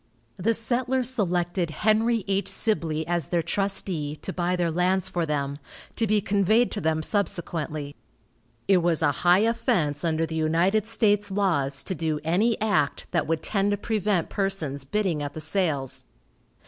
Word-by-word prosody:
The 225 +5 +2
settlers 250 +2 0
selected 175 -6 0
Henry 220 +5 +1
H. 195 0 0
Sibley 160 -8 -1
as 170 0 -1
their 170 -2 0
trustee, 175 -5 -1
to 190 - -4
buy 180 0 0
their 175 -2 0
lands 180 +2 +1
for 170 -2 -2
them, 140 -1 -2 0.4
to 225 - 0
be 210 0 +2
conveyed 210 +5 +2
to 205 - -4
them 160 0 0
subsequently. 155 -7 -2 0.7
It 195 - +5
was 170 -2 +1
a 145 - +4
high 180 +2 +5
offense 215 - +1
under 165 -1 +1
the 160 - -7
United 170 +7 +1
States 210 -2 +2
laws 165 -9 0
to - - -3
do 160 -3 -2
any 205 +8 +1
act 205 -10 0
that - - 0
would 160 0 -1
tend 200 -1 +1
to 205 - +1
prevent 205 -4 0
persons 165 -9 -2
bidding 180 -1 -1
at 145 -1 -5
the - - -5
sales. 155 -5 -1
180 Hz, 160 wpm, -25 LUFS, 160-205 Hz, 0.7 s, It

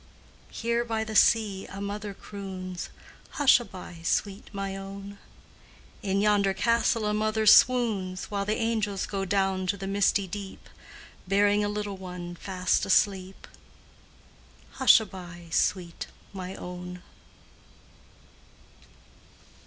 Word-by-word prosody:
Here 235 0 -1
by 225 -2 -2
the 220 0 -6
sea 210 -4 +3
a 195 - -8
mother 200 0 -5
croons 185 -3 -7 0.5
"Hushaby, 210 - +2
sweet 200 +3 -1
my 195 -2 -4
own!" 195 +1 -8 0.8
In 200 -2 0
yonder 200 -2 +3
castle 230 +1 +2
a 210 - +1
mother 215 +1 0
swoons 210 -6 +4
While 200 -1 -1
the 215 +1 0
angels 220 -4 -1
go 195 -1 -3
down 190 -1 0
to 200 +2 0
the 195 - -6
misty 200 0 +2
deep, 195 +1 -8 0.6
Bearing 205 +2 +3
a 205 - 0
little 205 -1 -4
one 180 -2 -7
fast 185 +1 0
asleep 190 -1 +1 1.3
Hushaby, 180 -9 +2
sweet 175 -1 0 0.3
my 185 -1 -6
own! 180 0 -8
200 Hz, 110 wpm, -27 LUFS, 185-210 Hz, 1.3 s, swoons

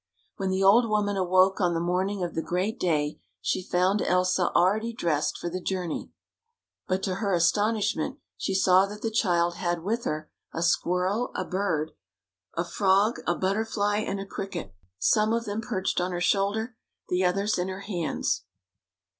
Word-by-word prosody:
When 190 -1 -1
the 190 +1 +1
old 225 +4 +6
woman 205 -1 +1
awoke 185 +1 +3
on 175 -2 +2
the - - +1
morning 185 +3 -1
of 175 - -3
the 160 - -1
great 190 +8 -2
day, 150 -4 0 0.2
she - - -1
found 185 +3 +1
Elsa 180 0 +2
already 215 +6 +2
dressed 155 -9 0
for - - -5
the 185 +2 -4
journey, 180 -3 -3 0.8
but 185 +1 -1
to 190 - 0
her 200 -3 +1
astonishment 205 +1 +1 0.2
she 195 - -2
saw 190 0 +5
that 210 +1 -9
the 225 - -1
child 175 -5 +1
had 175 -2 -1
with 230 +5 -1
her 155 0 -3 0.2
a 165 - -2
squirrel, 180 +7 +1
a - - -2
bird, 175 -5 -1 0.6
a 170 - -1
frog, 200 +5 +2
a 175 - +2
butterfly, 205 +1 0
and 200 -2 -2
a 195 - -5
cricket 190 - -6 0.2
— 90 - -59
some 215 - +3
of 230 0 -1
them 210 +2 -3
perched 195 -6 -1
on 180 +1 -1
her 175 - -2
shoulder, 205 +6 +1 0.3
the 180 +1 +1
others 195 +3 +1
in 180 - 0
her 190 +1 -5
hands. 175 - -2
190 Hz, 175 wpm, -27 LUFS, 175-205 Hz, 0.8 s, old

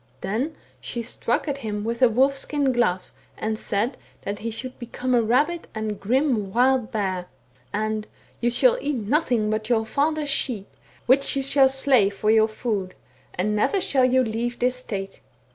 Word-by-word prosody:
* - - -35
Then 235 - -2 0.2
she 235 -1 -5
struck 240 +3 -2
at 280 -1 -2
him 210 -4 -4
with 230 +2 -3
a 250 - +7
wolf 265 +5 +3
skin 280 0 0
glove, 230 -7 0 0.3
and 220 0 -2
said, 225 +6 -1 0.3
that 200 +1 -4
he 230 - -3
should 250 +3 -6
become 250 +1 -3
a 240 - +5
rabid 290 +10 +1
and 215 -2 -3
grim 235 -3 +1
wild 250 +1 +2
bear; 190 -4 -2 0.4
and 215 0 -2 0.2
* - - -32
You 240 - +2
shall - - +3
eat 295 0 -1
nothing 235 -2 +1
but 215 +1 -2
your 225 -2 +2
father's 300 +5 0
sheep, 230 -8 -1 0.4
which 270 +3 +3
you 275 - 0
shall 275 0 +5
slay 265 -6 +4
for 210 +2 0
your 220 0 +5
food, 215 -4 -3 0.4
and 210 +4 0
never 300 - +2
shall 265 -7 +3
you 255 +1 +3
leave 235 +1 -2
this 250 +1 +1
state.' 195 -6 -5
240 Hz, 180 wpm, -24 LUFS, 215-265 Hz, 0.4 s, a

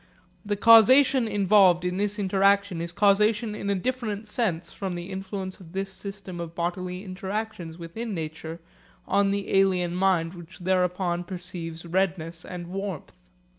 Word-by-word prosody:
The 205 -1 -1
causation 230 +4 +6
involved 195 -3 +4
in 180 0 -1
this 205 +1 0
interaction 195 -2 +2
is 170 0 -4
causation 210 +3 +3
in 200 -1 -4
a 200 - +2
different 220 0 -3
sense 185 -7 -2
from 190 -2 -4
the 175 +2 -6
influence 190 0 -5
of 170 -2 -14
this 195 0 -3
system 195 -2 -8
of 170 -1 -6
bodily 180 +2 -3
interactions 190 -2 -5
within 200 +6 -5
nature 160 0 -6 0.5
on 200 0 +3
the 200 0 -2
alien 185 -3 +3
mind 180 -2 +1
which 175 0 -12
thereupon 180 -1 0
perceives 175 -2 -6
redness 170 -1 -1
and 180 -1 -7
warmth. 190 -2 -5
190 Hz, 145 wpm, -26 LUFS, 175-200 Hz, 0.5 s, causation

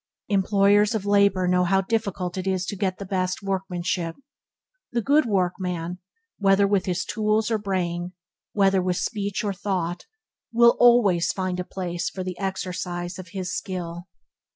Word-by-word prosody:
Employers 200 +2 +3
of 205 -2 -2
labour 200 -2 +3
know 180 0 +3
how 190 +2 +3
difficult 195 -4 -2
it 190 0 -4
is 185 -1 0
to 205 - -4
get 190 -2 -1
the 200 - -7
best 185 0 -2
workmanship. 180 -3 -2 0.8
The 235 - 0
good 285 +2 +3
workman, 180 -3 -1 0.4
whether 195 0 +4
with 195 -2 +1 0.2
tools 215 +1 0
or 220 - +1
brain, 180 -3 -2 0.4
whether 195 -2 +3
with 180 -1 0
speech 205 -3 -2
or 205 -2 -1
thought, 180 -3 -3 0.4
will 235 0 +6
always 230 -8 +5
find 185 -1 -3
a - - -1
place 175 -2 -3
for 185 - -5
the 180 -1 -6
exercise 180 -2 -4
of 185 - -8
his 185 +1 -4
skill. 175 -2 -5
190 Hz, 150 wpm, -24 LUFS, 180-200 Hz, 0.8 s, will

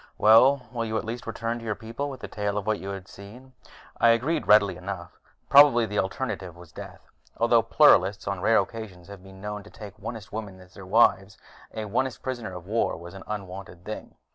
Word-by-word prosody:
Well, 125 +4 +5
will 120 -2 -3
you 110 -1 -2
at - - -3
least 115 +2 -6
return 115 +1 -3
to - - -11
your 110 -2 -2
people 115 +7 -5
with 135 - -9
a - - -4
tale 105 -1 -3
of 100 - -3
what 110 -1 0
you 95 - -7
have 95 -1 -7
seen?" 120 +8 -13 0.4
I 115 - +4
agreed 135 +8 +1
readily 105 -2 +5
enough: 90 -2 -7 0.3
probably, 140 -5 +7
the 105 -1 -2
alternative 95 -3 -3
was 85 -2 -14
death. - - -10 0.4
Although - - +4
Pluralists 95 +3 +4
on 100 -2 -3
rare 110 +3 +4
occasions 100 -7 -4
have 100 -2 -10
been 95 0 -14
known 105 0 -5
to 105 - -15
take 105 -3 -10
Onist 110 -4 -8
women 105 -3 -6
as 90 0 -17
their 95 - -11
wives, 100 -2 +3 0.3
an 110 -2 -6
Onist 130 +2 -1
prisoner 120 -7 -5
of 90 -1 -9
war 110 -1 0
was 85 +2 -11
an 95 - -10
unwanted 95 -3 -7
thing. 110 - -7
105 Hz, 210 wpm, -26 LUFS, 95-115 Hz, 0.4 s, probably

